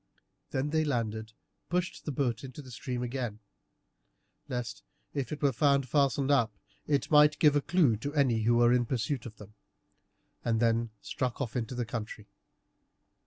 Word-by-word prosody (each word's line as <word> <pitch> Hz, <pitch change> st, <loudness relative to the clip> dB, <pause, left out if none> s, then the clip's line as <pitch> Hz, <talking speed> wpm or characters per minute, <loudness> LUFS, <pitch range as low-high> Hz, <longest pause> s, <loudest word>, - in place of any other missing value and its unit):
Then 135 Hz, +3 st, -1 dB
they 160 Hz, 0 st, +2 dB
landed, 110 Hz, -6 st, -2 dB, 0.4 s
pushed 180 Hz, +1 st, -2 dB
the 150 Hz, -, -2 dB
boat 125 Hz, -4 st, -1 dB
into 135 Hz, +2 st, -8 dB
the 130 Hz, -, -12 dB
stream 125 Hz, 0 st, -4 dB
again, 120 Hz, -3 st, -3 dB, 1.1 s
lest, 125 Hz, -1 st, -4 dB, 0.3 s
if 140 Hz, -1 st, -3 dB
it 150 Hz, -1 st, -5 dB
were 140 Hz, -, +4 dB
found 140 Hz, +2 st, +2 dB
fastened 140 Hz, 0 st, +2 dB
up, 120 Hz, -6 st, +3 dB, 0.4 s
it 145 Hz, +1 st, 0 dB
might 150 Hz, 0 st, +6 dB
give 150 Hz, -2 st, +5 dB
a 145 Hz, -, +3 dB
clue 145 Hz, -8 st, +3 dB
to 140 Hz, +7 st, -4 dB
any 130 Hz, -6 st, +3 dB
who 120 Hz, +2 st, +3 dB
were 120 Hz, 0 st, +5 dB
in 120 Hz, -1 st, +2 dB
pursuit 125 Hz, +1 st, -2 dB
of 110 Hz, -, -11 dB
them, 105 Hz, 0 st, -13 dB, 0.9 s
and 115 Hz, -1 st, +1 dB
then 115 Hz, 0 st, +2 dB
struck 125 Hz, -2 st, -3 dB
off 125 Hz, -6 st, -3 dB
into 125 Hz, 0 st, -2 dB
the 120 Hz, -1 st, -1 dB
country. 110 Hz, -1 st, -6 dB
125 Hz, 165 wpm, -30 LUFS, 115-145 Hz, 1.1 s, might